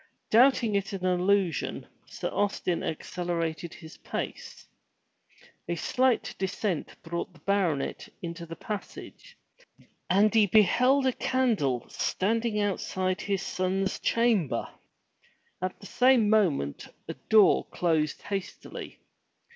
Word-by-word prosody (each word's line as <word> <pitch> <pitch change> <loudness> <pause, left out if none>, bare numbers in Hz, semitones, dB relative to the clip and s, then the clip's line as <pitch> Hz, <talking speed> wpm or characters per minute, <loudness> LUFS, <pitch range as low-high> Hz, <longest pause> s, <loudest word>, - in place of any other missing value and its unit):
Doubting 240 -1 +5
it 200 +1 -1
an 185 -1 -4
illusion, 185 0 +1 0.2
Sir - - -4
Austin 195 -4 -1
accelerated 170 0 -3
his 160 -1 -12
pace. - - -6 1.0
A 170 - 0
slight 255 +7 +1
descent 190 -2 -2
brought 170 +2 -4
the 165 - -19
baronet 180 -7 -1
into 170 0 -6
the 165 - -7
passage 215 - -8 0.7
and 205 +4 +4
he 220 -2 +5
beheld 250 +7 +4
a 260 - +2
candle 210 - 0
standing 225 +2 -1
outside 185 -2 -1
his 195 -1 -1
son's 190 +1 -1
chamber. 210 - +1 0.9
At 185 0 -3
the - - -13
same 245 -2 +4
moment 160 - +1 0.2
a - - -4 0.2
door 215 -2 +6
closed 160 -3 -1
hastily. 195 -2 -6
195 Hz, 110 wpm, -28 LUFS, 170-220 Hz, 1.0 s, door